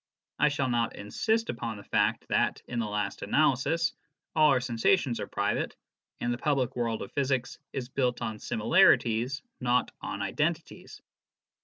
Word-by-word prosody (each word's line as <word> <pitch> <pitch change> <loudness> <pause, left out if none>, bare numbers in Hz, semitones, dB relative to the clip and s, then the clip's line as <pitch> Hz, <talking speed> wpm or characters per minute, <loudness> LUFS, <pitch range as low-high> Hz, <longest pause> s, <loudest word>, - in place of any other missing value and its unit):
I 150 - +5
shall 145 -2 -1
not 120 -2 0
insist 220 - -1
upon 115 -2 -5
the 100 - -10
fact - - +1
that, - - +1
in 120 - -3
the 115 - -1
last 105 -1 -3
analysis, 155 +3 +2 0.4
all 155 -1 +6
our 135 -3 +4
sensations 125 +2 +1
are - - -4
private, 100 +1 -1 0.4
and 120 0 0
the 120 - -5
public 135 -3 0
world 115 -2 -1
of - - -10
physics 135 -3 -1
is 125 -2 -4
built 125 -2 0
on 110 -3 -4
similarities, 120 - +3 0.2
not 125 -1 +1
on - - -4
identities. - - -3
125 Hz, 155 wpm, -29 LUFS, 115-140 Hz, 0.4 s, all